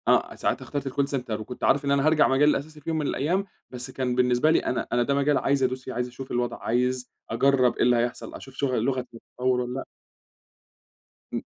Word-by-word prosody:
آه. -, -, +3 dB
ساعتها -, -, -1 dB
اخترت 140 Hz, -1 st, -4 dB
الcall 140 Hz, +2 st, 0 dB
center 110 Hz, -4 st, -4 dB
وكنت 125 Hz, +3 st, -8 dB
عارف 145 Hz, +1 st, +3 dB
إن 140 Hz, -, +1 dB
أنا 140 Hz, +1 st, +3 dB
هارجع 155 Hz, -1 st, +5 dB
المجال 140 Hz, +3 st, +4 dB
الأساسي 150 Hz, +1 st, -2 dB
في 145 Hz, -, -6 dB
يوم 160 Hz, -, 0 dB
من 150 Hz, -, -1 dB
الأيام، 175 Hz, +9 st, 0 dB, 0.3 s
بس 125 Hz, -1 st, -5 dB
كان 125 Hz, -2 st, -1 dB
بالنسبة 125 Hz, +4 st, +3 dB
لي -, -, +4 dB
أنا 125 Hz, -, -2 dB
أنا 120 Hz, 0 st, +3 dB
ده 140 Hz, -, 0 dB
مجال 140 Hz, 0 st, +3 dB
عايز 140 Hz, -1 st, +1 dB
أدوس 130 Hz, 0 st, -1 dB
فيه، 130 Hz, -, -6 dB
عايز 125 Hz, +1 st, -1 dB
أشوف 130 Hz, +2 st, -9 dB
الوضع، 120 Hz, 0 st, -1 dB
عايز 125 Hz, +2 st, 0 dB, 0.2 s
أجرّب 130 Hz, +1 st, +3 dB
إيه -, -, +1 dB
اللي 125 Hz, 0 st, +4 dB
هيحصل؟ 120 Hz, +1 st, -2 dB
أشوف 135 Hz, -, -11 dB
شغ 135 Hz, -1 st, -1 dB
اللغة 130 Hz, +3 st, +1 dB
هتطوّر 125 Hz, +1 st, -2 dB
والَّا 125 Hz, 0 st, -4 dB
لأ؟ 135 Hz, -, -4 dB, 1.5 s
إمم. -, -, -2 dB
130 Hz, 220 wpm, -26 LUFS, 125-140 Hz, 1.5 s, هارجع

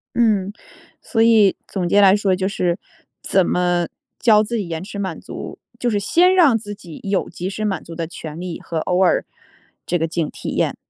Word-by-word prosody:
嗯， 210 Hz, -5 st, +2 dB, 0.5 s
所 225 Hz, -, -1 dB
以 220 Hz, -4 st, +5 dB
总 180 Hz, -3 st, -2 dB
结 205 Hz, -, +4 dB
来 195 Hz, -1 st, +7 dB
说 200 Hz, -2 st, +1 dB
就 190 Hz, +1 st, -1 dB
是 180 Hz, -3 st, -1 dB, 0.4 s
怎 190 Hz, -2 st, +2 dB
么 175 Hz, -1 st, +1 dB, 0.3 s
教 215 Hz, -3 st, +5 dB
自 235 Hz, +3 st, -4 dB
己 205 Hz, -5 st, -2 dB
延 165 Hz, 0 st, -4 dB
迟 200 Hz, +1 st, -8 dB
满 190 Hz, -4 st, -3 dB
足， -, -, -8 dB, 0.2 s
就 245 Hz, -, 0 dB
是 210 Hz, -3 st, +1 dB
先 355 Hz, -, +4 dB
让 310 Hz, -11 st, +5 dB
自 205 Hz, -1 st, -7 dB
己 170 Hz, -5 st, -11 dB
有 195 Hz, -1 st, -1 dB
及 180 Hz, +2 st, -5 dB
时 215 Hz, +2 st, -3 dB
满 195 Hz, -5 st, -2 dB
足 165 Hz, -, -10 dB
的 165 Hz, -1 st, -3 dB
权 160 Hz, -2 st, -8 dB
利 180 Hz, -1 st, -5 dB
和 165 Hz, -, -5 dB
偶 180 Hz, +3 st, +1 dB
尔 180 Hz, -, +2 dB, 0.6 s
这 175 Hz, -, 0 dB
个 165 Hz, -, 0 dB
劲 165 Hz, -1 st, -2 dB
体 -, -, -6 dB
验， -, -, 0 dB
195 Hz, 220 characters per minute, -20 LUFS, 175-210 Hz, 0.6 s, 来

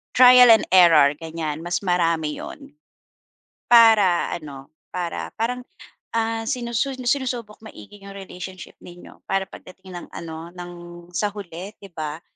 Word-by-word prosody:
Trial 250 Hz, 0 st, +8 dB
and 225 Hz, -1 st, +6 dB
error, 165 Hz, -6 st, +6 dB
ganyan, 160 Hz, -2 st, -5 dB
mas 175 Hz, +4 st, -3 dB
marami 165 Hz, -4 st, 0 dB
yun. 280 Hz, -1 st, -10 dB, 0.9 s
Para 220 Hz, -7 st, +5 dB
ano, 140 Hz, -4 st, -11 dB, 0.2 s
para 175 Hz, -2 st, -4 dB
parang, 245 Hz, +2 st, -3 dB, 0.5 s
ah, 225 Hz, 0 st, -1 dB
sinusu 240 Hz, +2 st, -2 dB, 0.2 s
sinusubok 245 Hz, -6 st, -2 dB
maigi 205 Hz, -, -13 dB
yung 200 Hz, -, -10 dB
relationship 190 Hz, -1 st, -10 dB
ninyo 175 Hz, 0 st, -15 dB
para 195 Hz, 0 st, -2 dB
pagdating 185 Hz, 0 st, -12 dB
ng 175 Hz, -, -9 dB
ano, 165 Hz, +1 st, -8 dB
ng 175 Hz, -1 st, -9 dB, 0.4 s
sa 205 Hz, +3 st, -1 dB
huli, 195 Hz, 0 st, -8 dB
'di 200 Hz, -, -12 dB
ba? 155 Hz, 0 st, -6 dB
185 Hz, 130 wpm, -22 LUFS, 170-225 Hz, 0.9 s, Trial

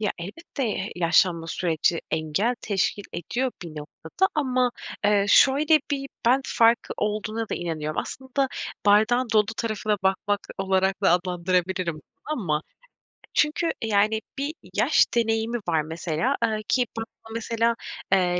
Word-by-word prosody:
Ya, 210 Hz, -, 0 dB
elbette, 265 Hz, -, -5 dB
eee, 205 Hz, -2 st, -2 dB
yaşlanma 170 Hz, -1 st, +3 dB
süreci 165 Hz, -1 st, 0 dB
engel 160 Hz, +10 st, 0 dB
teşkil 205 Hz, 0 st, -1 dB
ediyor 240 Hz, +10 st, -2 dB
bir 170 Hz, -, -7 dB
noktada. 160 Hz, -, -2 dB
Ama, 255 Hz, -4 st, +1 dB, 0.3 s
eee, 205 Hz, -1 st, +4 dB
şöyle 295 Hz, +5 st, +5 dB
bir 275 Hz, -1 st, -2 dB, 0.2 s
"ben" 255 Hz, +3 st, +5 dB
farkı 230 Hz, 0 st, +3 dB
olduğuna 215 Hz, +1 st, -2 dB
da -, -, -2 dB
inanıyorum. 155 Hz, -3 st, -3 dB
Aslında 265 Hz, +1 st, -2 dB, 0.4 s
bardağın 230 Hz, +4 st, +4 dB
dolu 210 Hz, -1 st, +4 dB
tarafına 215 Hz, -2 st, -1 dB
bakmak 195 Hz, +1 st, +1 dB, 0.2 s
olarak 190 Hz, 0 st, +1 dB
da 195 Hz, -, +5 dB
adlandırabilirim 180 Hz, 0 st, 0 dB
bunu 155 Hz, -, -12 dB, 0.4 s
ama. 150 Hz, -3 st, 0 dB, 0.7 s
Çünkü 310 Hz, +3 st, +2 dB
yani, 215 Hz, 0 st, +2 dB, 0.2 s
bir 285 Hz, +3 st, -2 dB, 0.2 s
yaş -, -, +4 dB
deneyimi 225 Hz, 0 st, +1 dB
var 160 Hz, -2 st, +2 dB
mesela, 160 Hz, -, -1 dB
eee, 215 Hz, -1 st, 0 dB
ki 250 Hz, -1 st, +2 dB
ben 225 Hz, -, -2 dB, 0.2 s
burada 225 Hz, -, -10 dB
mesela, 230 Hz, 0 st, 0 dB, 0.4 s
eee, 180 Hz, -2 st, +3 dB
210 Hz, 135 wpm, -25 LUFS, 180-240 Hz, 0.7 s, şöyle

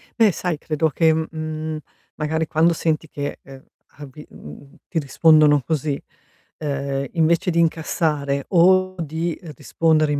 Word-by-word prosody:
Beh 225 Hz, -4 st, +4 dB
sai, 175 Hz, -2 st, -3 dB
credo 155 Hz, +1 st, -1 dB
che, 160 Hz, +2 st, +3 dB
mhmm, 155 Hz, 0 st, -4 dB, 0.4 s
magari 160 Hz, +1 st, -1 dB
quando 165 Hz, +2 st, +3 dB
senti 160 Hz, -1 st, -1 dB
che, 145 Hz, -1 st, -5 dB
ehm, 135 Hz, 0 st, -13 dB, 0.4 s
avi 145 Hz, +1 st, -11 dB
mhmm, 75 Hz, -, -13 dB
ti 170 Hz, -, -1 dB
rispondono 150 Hz, 0 st, +4 dB
così, 150 Hz, 0 st, -2 dB, 0.6 s
ehm, 140 Hz, -2 st, -3 dB
invece 165 Hz, +2 st, +2 dB
di 170 Hz, -, +1 dB
incassare 150 Hz, -4 st, 0 dB
o 185 Hz, +1 st, +4 dB
di 165 Hz, +1 st, -3 dB, 0.2 s
rispondere 155 Hz, +2 st, +1 dB
in 145 Hz, -, 0 dB
155 Hz, 135 wpm, -21 LUFS, 145-165 Hz, 0.6 s, Beh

